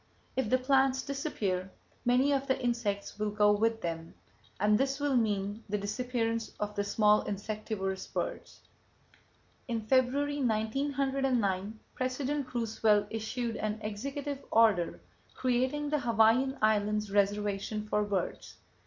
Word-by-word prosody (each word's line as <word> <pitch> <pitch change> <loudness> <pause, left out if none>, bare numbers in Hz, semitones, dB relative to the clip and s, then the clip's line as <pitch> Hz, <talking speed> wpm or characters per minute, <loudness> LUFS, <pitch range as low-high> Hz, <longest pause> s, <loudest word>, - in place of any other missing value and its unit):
If 260 -5 0
the 255 - +4
plants 265 0 +2
disappear, 205 -10 -2 0.4
many 250 +4 +4
of 275 0 0
the 265 - +1
insects 230 -5 -2
will 210 0 0
go 210 0 +4
with 225 +2 +1
them; 165 -1 -5 0.4
and 210 +2 +4
this 270 +4 +1
will 285 -2 +1
mean 205 -2 0
the 210 - 0
disappearance 230 +2 -2
of 210 0 -2
the 205 - -1
small 210 +1 +4
insectivorous 205 -1 -3
birds. - - -5 1.1
In 230 -2 -1
February, 265 +5 +1
1909, 240 -3 0
President 260 +2 -2
Roosevelt 220 -3 +2
issued 225 +1 -3
an 215 0 -2
executive 275 +7 -4
order 215 -7 +3 0.4
creating 260 +4 0
the 300 - +2
Hawaiian 240 +3 +3
Islands 210 -1 +2
Reservation 205 +1 0
for 210 0 +1
Birds. 200 -3 -3
225 Hz, 125 wpm, -31 LUFS, 210-260 Hz, 1.1 s, the